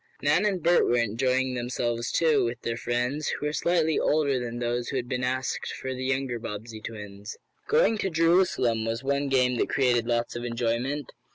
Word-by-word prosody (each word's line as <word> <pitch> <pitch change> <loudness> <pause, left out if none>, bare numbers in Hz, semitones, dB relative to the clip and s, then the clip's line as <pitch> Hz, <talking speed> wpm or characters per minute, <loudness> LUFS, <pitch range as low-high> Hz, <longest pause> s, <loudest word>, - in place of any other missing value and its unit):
Nan 150 +8 +3
and 190 -5 -1
Bert 175 +1 +4
were 120 - +3
enjoying 125 +3 +1
themselves, 120 -1 -2
too, 160 -3 +3
with 120 0 -2
their 115 - -1
friends, 125 +5 -1
who - - -2
were 150 - -1
slightly 160 -2 +1
older 145 -3 +2
than 120 -1 -4
those 120 0 -2
who - - -4
had 125 -2 -2
been 125 0 -2
asked 130 +1 -2
for 130 - -4
the 130 0 -5
younger 130 -2 -1
Bobbsey 110 0 -7
twins. 105 -1 -8 0.3
"Going 450 - +3
to 190 - 0
Jerusalem," 165 -9 +2
was 115 +2 -3
one 140 +1 0
game 125 -2 +2
that - - +1
created 120 -3 +2
lots 120 -1 -1
of 120 - -4
enjoyment. 120 +4 -2
125 Hz, 190 wpm, -27 LUFS, 120-145 Hz, 0.3 s, Bert